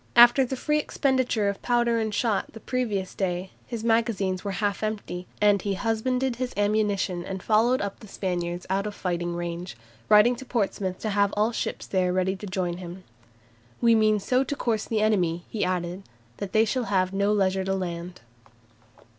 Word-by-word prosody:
After 240 Hz, +3 st, +8 dB
the 260 Hz, +1 st, -3 dB
free 300 Hz, +3 st, +1 dB
expenditure 260 Hz, -7 st, +1 dB
of 200 Hz, 0 st, -2 dB
powder 240 Hz, -1 st, +2 dB
and 220 Hz, -1 st, -1 dB
shot 215 Hz, -1 st, 0 dB
the 225 Hz, -, -9 dB
previous 215 Hz, -7 st, -2 dB
day, 185 Hz, -1 st, -2 dB, 0.2 s
his 230 Hz, -2 st, -5 dB
magazines 225 Hz, -5 st, +1 dB
were 200 Hz, -1 st, -3 dB
half 205 Hz, 0 st, -1 dB
empty, 205 Hz, -4 st, -4 dB
and 205 Hz, -2 st, +4 dB
he 200 Hz, 0 st, -1 dB
husbanded 235 Hz, +4 st, 0 dB
his 255 Hz, 0 st, -3 dB
ammunition 205 Hz, -3 st, +1 dB
and 190 Hz, 0 st, -6 dB
followed 230 Hz, +4 st, +3 dB
up 200 Hz, -1 st, -4 dB
the 215 Hz, -, -12 dB
Spaniards 175 Hz, -2 st, -3 dB
out 195 Hz, +2 st, 0 dB
of 205 Hz, -, -6 dB
fighting 175 Hz, -1 st, -2 dB
range, 175 Hz, -4 st, -5 dB, 0.3 s
writing 215 Hz, +4 st, +6 dB
to 265 Hz, -, -8 dB
Portsmouth 200 Hz, -6 st, -1 dB
to 215 Hz, -, -2 dB
have 200 Hz, 0 st, +2 dB
all 215 Hz, +2 st, +3 dB
ships -, -, -3 dB
there 185 Hz, -2 st, +1 dB
ready 185 Hz, +1 st, +1 dB
to 205 Hz, -, -7 dB
join 185 Hz, -2 st, -2 dB
him. 180 Hz, +1 st, -8 dB, 0.8 s
"We 235 Hz, -1 st, +5 dB
mean 215 Hz, -1 st, +4 dB
so 255 Hz, +6 st, +2 dB
to 285 Hz, -, -3 dB
course 225 Hz, -5 st, -1 dB
the 220 Hz, -2 st, 0 dB
enemy," 175 Hz, -6 st, +1 dB
he 215 Hz, -, -1 dB
added, 180 Hz, 0 st, -2 dB, 0.4 s
"that 200 Hz, -2 st, -5 dB
they 220 Hz, +2 st, +4 dB
shall 245 Hz, +2 st, -1 dB
have 185 Hz, -2 st, +1 dB
no 200 Hz, +1 st, +2 dB
leisure 190 Hz, -2 st, +2 dB
to 195 Hz, 0 st, 0 dB
land." 175 Hz, -5 st, -5 dB
205 Hz, 185 wpm, -26 LUFS, 185-225 Hz, 0.8 s, After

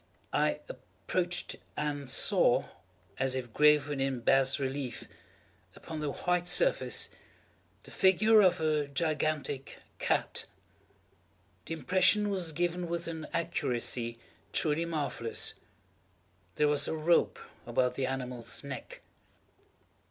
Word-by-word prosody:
I -, -, +1 dB
approached 180 Hz, -, -3 dB, 0.2 s
and 145 Hz, -2 st, -2 dB
saw, -, -, +3 dB, 0.5 s
as 135 Hz, -1 st, +1 dB
if 125 Hz, -3 st, -4 dB
graven 150 Hz, -1 st, +4 dB
in 135 Hz, -2 st, -1 dB
bas 135 Hz, +3 st, +3 dB
relief 135 Hz, -3 st, -4 dB, 0.7 s
upon 160 Hz, -1 st, -7 dB
the 150 Hz, -2 st, -1 dB
white 180 Hz, +4 st, 0 dB
surface, -, -, +2 dB, 0.7 s
the -, -, -14 dB
figure 215 Hz, +4 st, +5 dB
of 185 Hz, -4 st, +4 dB
a 155 Hz, -2 st, +1 dB
gigantic 150 Hz, -2 st, -1 dB, 0.2 s
cat. -, -, 0 dB, 1.2 s
The 165 Hz, -, -2 dB
impression 185 Hz, +6 st, +3 dB
was 180 Hz, -4 st, -1 dB
given 175 Hz, +2 st, -1 dB
with 170 Hz, 0 st, -3 dB
an 160 Hz, -2 st, -5 dB
accuracy 120 Hz, -7 st, -2 dB, 0.4 s
truly 155 Hz, +1 st, +1 dB
marvellous. 145 Hz, -8 st, -2 dB, 1.0 s
There 150 Hz, -, +3 dB
was 145 Hz, -1 st, +2 dB
a -, -, -1 dB
rope 160 Hz, +2 st, +3 dB, 0.3 s
about 125 Hz, -1 st, +1 dB
the 135 Hz, -1 st, -1 dB
animal's 125 Hz, -3 st, -4 dB
neck. -, -, -7 dB
150 Hz, 110 wpm, -31 LUFS, 135-170 Hz, 1.2 s, figure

